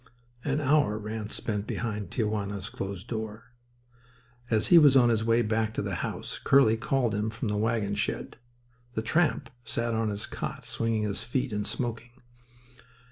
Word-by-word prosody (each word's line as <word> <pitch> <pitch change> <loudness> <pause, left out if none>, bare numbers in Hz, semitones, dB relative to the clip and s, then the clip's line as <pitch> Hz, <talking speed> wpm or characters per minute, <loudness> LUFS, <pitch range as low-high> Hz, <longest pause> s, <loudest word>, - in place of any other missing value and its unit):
An 145 +1 0
hour 145 -7 +3
Ranse 110 0 -5
spent 105 -2 -2
behind 105 -5 -3
Tia 115 - 0
Juana's 100 -1 -3
closed 95 +1 -5
door. 110 +1 -5 1.0
As 110 -2 +2
he 175 - +9
was 145 -3 +7
on 120 -2 +6
his 110 -2 +2
way 115 +1 +3
back 110 0 0
to - - -1
the - - -3
house - - -4
Curly 135 -5 +5
called 125 +1 +1
to 100 - -1
him 105 +1 0
from 115 +1 -3
the 105 - 0
wagon 110 -1 0
shed. 105 - -2 0.6
The 110 - -1
tramp 160 +5 +1
sat 115 0 -2
on 110 -1 +1
his 100 0 -3
cot, - - -5
swinging 115 -1 -1
his 105 -2 -2
feet 125 -1 -1
and 105 0 -1
smoking. 120 -1 -3
110 Hz, 175 wpm, -28 LUFS, 105-120 Hz, 1.0 s, he